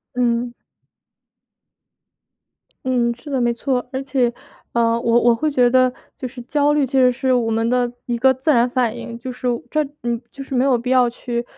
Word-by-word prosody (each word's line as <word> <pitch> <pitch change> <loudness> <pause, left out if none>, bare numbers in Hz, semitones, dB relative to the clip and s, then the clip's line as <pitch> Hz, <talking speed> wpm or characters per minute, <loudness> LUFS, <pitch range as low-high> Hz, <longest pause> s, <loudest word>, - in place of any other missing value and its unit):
嗯。 240 -1 0 2.3
嗯， 245 -2 +2
是 290 +5 -11
的 265 -2 0
没 240 0 +2
错。 250 +1 -1
而 265 0 -3
且， 260 -3 +1 0.4
呃， 230 0 +2
我 235 0 +3
我 240 0 +4
会 305 +7 0
觉 250 -4 +3
得， 255 0 +4 0.3
就 255 - -4
是 245 +1 -11
焦 290 +3 +1
虑 295 -2 +2
其 265 +1 0
实 250 -1 +5
是 260 +1 0
我 240 -2 +1
们 225 +1 0
的 245 0 +1
一 240 - -1
个 260 +3 +4
自 265 +5 +1
然 240 -2 +3
反 245 -3 0
应。 235 -1 -7
就 255 +2 -6
是 250 0 -5 0.2
这 305 0 +2 0.2
嗯， 235 -1 -2
就 275 - -8
是 270 - -9
没 255 0 +2
有 265 -2 +3
必 245 +2 -3
要 250 -2 +4
去 235 0 -4
250 Hz, 210 characters per minute, -20 LUFS, 235-260 Hz, 2.3 s, 实